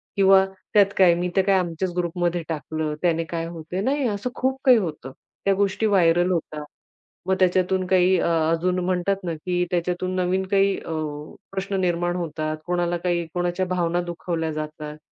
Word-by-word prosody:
किंवा 195 -1 +6 0.3
त्यात 200 -2 +5
काय, 185 -3 +6
मी 175 +1 -2
तर 195 - +5
काय 195 -1 +4
आमच्याच 175 0 -3
ग्रुपमध्ये 175 0 -1
टाकलं. 155 -1 -3
त्याने 165 -2 +1
काय 165 0 -4
होतंय? 170 +2 -5
नाही, 275 +4 0
असं 205 +2 -2
खूप 265 +1 -1
काही 255 -2 +7
होतं. 155 -9 -4 0.3
त्या 195 - +4
गोष्टी 200 +2 0
व्हायरल 175 -3 +3
होतात. 155 -3 -3 0.6
मग 190 +1 +2
त्याच्यातून 185 0 +2
काही 185 0 +4
अ, - - 0 0.2
अजून 180 +2 0
म्हणतात 185 +1 +1
ना, 170 -2 -2
की 180 +3 -1
त्याच्यातून 180 +1 -1
नवीन 185 +1 0
काही 195 0 +3
अ, - - -10 0.6
प्रश्न 195 +1 -3
निर्माण 175 -1 0
होतात. 155 -3 -3
कोणाला 175 0 0
काही, 175 -1 -1
कोणाच्या 175 +1 -1
भावना 175 -1 0
दुखावल्या 170 -2 -3
जातात 155 0 -6
180 Hz, 165 wpm, -23 LUFS, 170-190 Hz, 0.6 s, काही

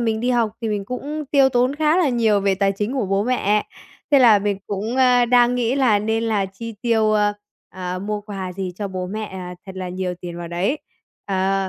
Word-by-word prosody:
mình 225 -2 0
đi 245 +2 0
học 235 -3 +2
thì 230 - -2
mình 205 -2 -2
cũng 290 +6 -5
tiêu 275 -2 +5
tốn 250 +1 +1
khá 310 +1 +3
là 360 -5 +3
nhiều 225 -5 +2
về 195 0 +2
tài 195 0 +1
chính 210 +4 -3
của 255 -7 -1
bố 195 +1 +1
mẹ, 210 -4 +1 0.4
thế 285 - +6
là 230 -5 +7
mình 200 -1 -1
cũng, 210 +5 -3
ơ, 250 -2 +5
đang 245 0 +4
nghĩ 245 0 0
là 255 -7 +3
nên 220 +2 -1
là 210 -4 0
chi 220 +4 -8
tiêu, 220 -3 +2
ơ, 210 -1 +2 0.4
à, 180 -1 -5
mua 210 +2 -3
quà 195 -3 -6
gì 185 0 -4
cho 205 0 -4
bố 185 -1 -4
mẹ, 215 +3 -4
à, 180 -3 -7
thật 190 - -7
là 185 -1 -4
nhiều 180 0 -3
tiền 175 -1 -7
vào 170 -1 -6
đấy, 185 - -1 0.5
ờ, 195 0 0
210 Hz, 230 wpm, -21 LUFS, 195-245 Hz, 0.5 s, là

